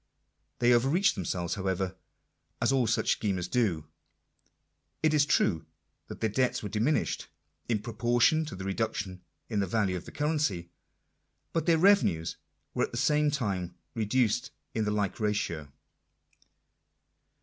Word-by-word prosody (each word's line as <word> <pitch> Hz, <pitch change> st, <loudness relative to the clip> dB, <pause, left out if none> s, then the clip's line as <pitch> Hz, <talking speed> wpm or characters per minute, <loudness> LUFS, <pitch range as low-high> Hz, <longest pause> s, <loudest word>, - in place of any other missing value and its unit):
They 120 Hz, 0 st, +4 dB
overreached 140 Hz, +11 st, +3 dB
themselves, 90 Hz, -1 st, -2 dB
however, 95 Hz, -1 st, -2 dB, 0.6 s
as -, -, +2 dB
all 130 Hz, -3 st, +2 dB
such 110 Hz, -, +2 dB
schemers 95 Hz, -4 st, 0 dB
do. 95 Hz, -10 st, 0 dB, 1.2 s
It 155 Hz, -1 st, +4 dB
is 145 Hz, -1 st, +4 dB
true 80 Hz, -, +2 dB, 0.4 s
that -, -, -9 dB
their 110 Hz, -, +2 dB
debts 125 Hz, +2 st, +1 dB
were 105 Hz, -, -3 dB
diminished 110 Hz, +9 st, 0 dB, 0.2 s
" -, -, -41 dB
in 105 Hz, -3 st, 0 dB
proportion 120 Hz, +7 st, +2 dB
to 150 Hz, -, -7 dB
the 95 Hz, -, -7 dB
reduction 95 Hz, -2 st, -2 dB, 0.3 s
in 105 Hz, -3 st, -1 dB
the 100 Hz, -, 0 dB
value 100 Hz, -1 st, +1 dB
of 90 Hz, -, -5 dB
the -, -, -10 dB
currency; 145 Hz, -, -1 dB, 0.8 s
but 165 Hz, -2 st, -1 dB
their 165 Hz, -1 st, +5 dB
revenues 160 Hz, -, +3 dB, 0.4 s
were -, -, +1 dB
at -, -, -13 dB
the -, -, -5 dB
same 150 Hz, 0 st, +3 dB
time 100 Hz, -, -2 dB, 0.2 s
re 110 Hz, -2 st, -1 dB
duced 120 Hz, 0 st, +1 dB, 0.2 s
in 110 Hz, -1 st, 0 dB
the 105 Hz, -, 0 dB
like 105 Hz, 0 st, -1 dB
ratio. 100 Hz, -9 st, -1 dB
110 Hz, 150 wpm, -29 LUFS, 95-130 Hz, 1.2 s, their